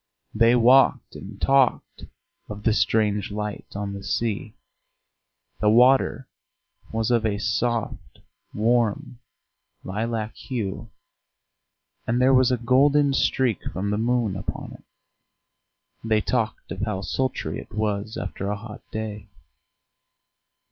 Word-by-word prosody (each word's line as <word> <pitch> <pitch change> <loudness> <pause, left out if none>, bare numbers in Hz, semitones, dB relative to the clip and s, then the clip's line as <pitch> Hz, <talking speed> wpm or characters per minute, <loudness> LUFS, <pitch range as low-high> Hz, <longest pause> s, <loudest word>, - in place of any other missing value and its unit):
They 115 +2 +4
walked 125 +1 +4
and 100 +1 -10
talked 135 -2 +1 0.4
of 105 0 -7
the 110 - +3
strange 105 -2 +1
light 105 0 -5
on 100 0 -4
the 100 0 -7
sea: 110 -1 -2 1.0
the 105 - +3
water 125 +3 +4 0.6
was 110 +1 -1
of 120 -2 +2
a 105 -2 0
soft 115 +2 -2 0.3
warm 115 +1 0 0.6
lilac 110 +2 -3
hue, 110 -3 -5 1.2
and 120 +2 +1
there 130 +1 +4
was 130 -1 +4
a 125 - +2
golden 140 +4 +3
streak 130 -5 +1
from 100 +3 -3
the 105 - -1
moon 115 -3 0
upon 95 - -6
it. - - -15 1.2
They 110 -1 +2
talked 115 -2 -2
of 95 - -5
how 105 -2 -2
sultry 130 +5 -2
it - - -12
was 105 0 -2
after 100 - -5
a 105 - -2
hot 105 0 -10
day. 110 -1 -5
110 Hz, 120 wpm, -24 LUFS, 105-125 Hz, 1.2 s, They